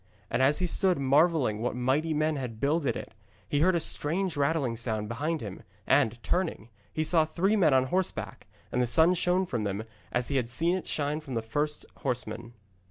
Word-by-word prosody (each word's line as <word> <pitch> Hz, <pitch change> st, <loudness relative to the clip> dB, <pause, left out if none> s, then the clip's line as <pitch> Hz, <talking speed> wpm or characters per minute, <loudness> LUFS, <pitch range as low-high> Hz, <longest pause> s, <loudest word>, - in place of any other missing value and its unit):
And 115 Hz, -, +1 dB
as 140 Hz, +3 st, +4 dB
he 185 Hz, -, 0 dB
stood 185 Hz, +1 st, +2 dB
marvelling 140 Hz, -4 st, +3 dB
what 120 Hz, -, -1 dB
mighty 135 Hz, +6 st, +1 dB
men 155 Hz, 0 st, +1 dB
had 125 Hz, -5 st, -5 dB
builded 145 Hz, +2 st, +1 dB
it, -, -, -7 dB, 0.3 s
he 145 Hz, -, 0 dB
heard 180 Hz, +4 st, +4 dB
a -, -, +2 dB
strange 170 Hz, +4 st, 0 dB
rattling 140 Hz, -4 st, +1 dB
sound 110 Hz, -2 st, -2 dB
behind 150 Hz, +8 st, -2 dB
him, 100 Hz, -4 st, -7 dB, 0.2 s
and, 130 Hz, -5 st, +3 dB
turning, 170 Hz, -, -1 dB, 0.2 s
he 155 Hz, -, -1 dB
saw 160 Hz, +1 st, +3 dB
three 175 Hz, +7 st, +1 dB
men 180 Hz, -8 st, +4 dB
on 130 Hz, -, +5 dB
horseback, 180 Hz, +8 st, -3 dB, 0.2 s
and 125 Hz, -, +1 dB
the 125 Hz, -, +1 dB
sun 160 Hz, +8 st, +5 dB
shone 180 Hz, +1 st, +1 dB
from 120 Hz, -10 st, -3 dB
them 100 Hz, +1 st, -2 dB, 0.3 s
as 120 Hz, 0 st, -1 dB
he 140 Hz, -, +1 dB
had 120 Hz, -3 st, -1 dB
seen 165 Hz, +9 st, +1 dB
it 185 Hz, -, -5 dB
shine 150 Hz, +1 st, -1 dB
from 135 Hz, -5 st, -7 dB
the 115 Hz, -, 0 dB
first 145 Hz, +6 st, -2 dB
horseman. 120 Hz, -3 st, -4 dB
145 Hz, 200 wpm, -28 LUFS, 120-165 Hz, 0.3 s, on